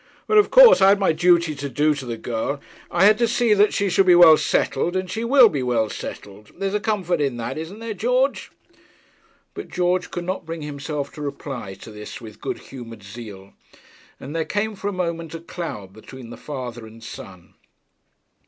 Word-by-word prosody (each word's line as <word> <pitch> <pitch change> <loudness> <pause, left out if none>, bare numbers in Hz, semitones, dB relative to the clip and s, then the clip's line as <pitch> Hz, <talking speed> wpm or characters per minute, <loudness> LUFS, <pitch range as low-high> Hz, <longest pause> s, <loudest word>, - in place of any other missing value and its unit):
'But 430 - +4
of 415 - +3
course - - +8
I 190 - +7
had 200 0 +4
my 195 - +3
duty 170 -1 +3
to 140 -1 -6
do 150 +4 +2
to 140 -3 -7
the 115 -1 -4
girl. 120 +5 -3 0.3
I 175 +3 +3
had 215 +2 +5
to 235 - +3
see 235 -1 +2
that 210 0 +4
she 200 - 0
should 190 +1 +2
be 180 - +7
well 170 -3 +9
settled, 170 +3 0
and 185 0 -1
she 220 +5 -4
will 250 0 +7
be 150 -9 -2
well 120 -3 0
settled. 105 +1 -9
There's 195 +1 -2
a 210 - +1
comfort 195 -6 -1
in 135 -4 -1
that; 115 - -4
isn't 165 +6 -7
there, 230 0 -5
George?' 250 +7 0 1.0
But 405 - -7
George 180 0 -1
could 175 - -5
not 185 +2 -3
bring 165 -1 -7
himself 145 0 -5
to 150 - -9
reply 140 -8 -6
to 110 - -12
this 105 0 -9
with 110 -3 -12
good - - -3
humoured 115 -5 -11
zeal, 100 -2 -11 0.7
and 140 +4 -8
there 165 - 0
came 210 +5 -2
for 200 - -5
a - - 0
moment 170 -3 -4
a - - -6
cloud 160 - -7
between 115 +3 -12
the - - -8
father 125 -5 -7
and 115 +1 -15
son. 90 -5 -11
160 Hz, 205 wpm, -22 LUFS, 120-195 Hz, 1.0 s, well